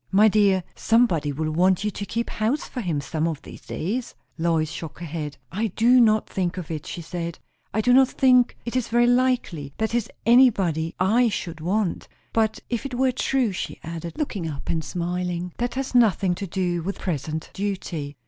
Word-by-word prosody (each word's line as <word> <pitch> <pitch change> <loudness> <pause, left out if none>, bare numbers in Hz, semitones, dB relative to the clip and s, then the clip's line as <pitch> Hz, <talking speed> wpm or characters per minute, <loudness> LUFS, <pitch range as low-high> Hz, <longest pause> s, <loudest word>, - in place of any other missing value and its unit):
"My 205 +3 +6
dear, 200 -3 +3
somebody 185 -11 +2
will 155 +2 -2
want 180 +4 +3
you 210 - 0
to 200 - -5
keep 235 +4 -2
house 230 +8 0
for 250 - -5
him, 165 -8 -1
some 155 +3 -1
of 155 -4 -4
these - - -11
days." 230 +9 -4 0.2
Lois 165 -2 0
shook 165 -3 -7
her 175 - -7
head. 150 -3 -5
"I 215 +5 0
do 235 +5 +4
not 215 -2 +3
think 185 -1 -2
of 170 -3 -5
it," 155 -2 -5
she 170 - -6
said. 170 0 -5 0.3
"I 220 - +1
do 245 +3 +4
not 265 0 +7
think 250 -2 +3
it 235 - -4
is 250 -3 0
very 240 +1 +3
likely; 245 - +1
that 220 +1 -1
is, 235 -2 0 0.2
anybody 195 -10 +4
I 225 +6 +4
should 170 -5 -4
want. 190 +2 -1 0.3
But 220 -1 +1
if 235 -2 -2
it 270 -3 -5
were 260 +1 +2
true," 255 -2 +1
she 185 - -5
added, 165 - -6
looking 210 - -2
up 140 -2 -7
and 160 -1 -1
smiling, 175 +2 -3
"that 245 +1 -1
has 270 0 -3
nothing 200 -6 +4
to 195 +2 -5
do 175 -1 -1
with 195 +4 -4
present 155 -2 -3
duty." 175 -8 -4
190 Hz, 195 wpm, -24 LUFS, 165-235 Hz, 0.3 s, not